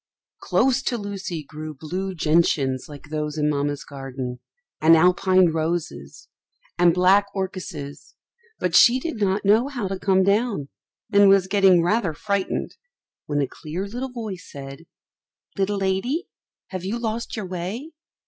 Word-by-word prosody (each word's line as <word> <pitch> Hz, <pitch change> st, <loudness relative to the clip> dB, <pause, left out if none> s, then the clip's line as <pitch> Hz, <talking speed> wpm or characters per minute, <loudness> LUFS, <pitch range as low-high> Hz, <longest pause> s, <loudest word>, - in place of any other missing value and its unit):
Close 265 Hz, 0 st, +2 dB
to 250 Hz, -2 st, -1 dB
Lucy 195 Hz, -6 st, -5 dB
grew 155 Hz, +1 st, -8 dB
blue 185 Hz, +6 st, -4 dB
gentians 150 Hz, -5 st, +1 dB
like 145 Hz, 0 st, -11 dB
those 150 Hz, 0 st, -3 dB
in 150 Hz, -1 st, +1 dB
Mamma's 145 Hz, -1 st, -1 dB
garden, 135 Hz, -3 st, -6 dB, 0.4 s
and 165 Hz, +1 st, +7 dB
Alpine 180 Hz, +1 st, +4 dB
roses, 160 Hz, -, -3 dB, 0.5 s
and 175 Hz, -1 st, +6 dB
black 185 Hz, +3 st, +4 dB
orchises; 185 Hz, -7 st, -6 dB, 0.4 s
but 175 Hz, -2 st, -1 dB
she 245 Hz, +2 st, +7 dB
did 320 Hz, -1 st, -4 dB
not 195 Hz, +1 st, +1 dB
know 220 Hz, +6 st, +4 dB
how 245 Hz, -8 st, -3 dB
to 190 Hz, 0 st, -4 dB
come 190 Hz, -1 st, +3 dB
down, 200 Hz, -, +1 dB, 0.4 s
and 200 Hz, 0 st, +7 dB
was 195 Hz, -1 st, +5 dB
getting 190 Hz, -3 st, +4 dB
rather 180 Hz, -3 st, +1 dB
frightened 200 Hz, +2 st, -2 dB, 0.5 s
when 145 Hz, -1 st, 0 dB
a -, -, -1 dB
clear 165 Hz, +9 st, -6 dB
little 245 Hz, +6 st, -5 dB
voice 215 Hz, -7 st, -7 dB
said, 140 Hz, +3 st, -9 dB, 0.7 s
"Little 200 Hz, +1 st, 0 dB
lady, 195 Hz, -, -1 dB, 0.4 s
have 185 Hz, -2 st, -5 dB
you 200 Hz, +5 st, -2 dB
lost 230 Hz, 0 st, -3 dB
your 215 Hz, -4 st, -4 dB
way? 185 Hz, -, -5 dB
185 Hz, 145 wpm, -23 LUFS, 155-205 Hz, 0.7 s, and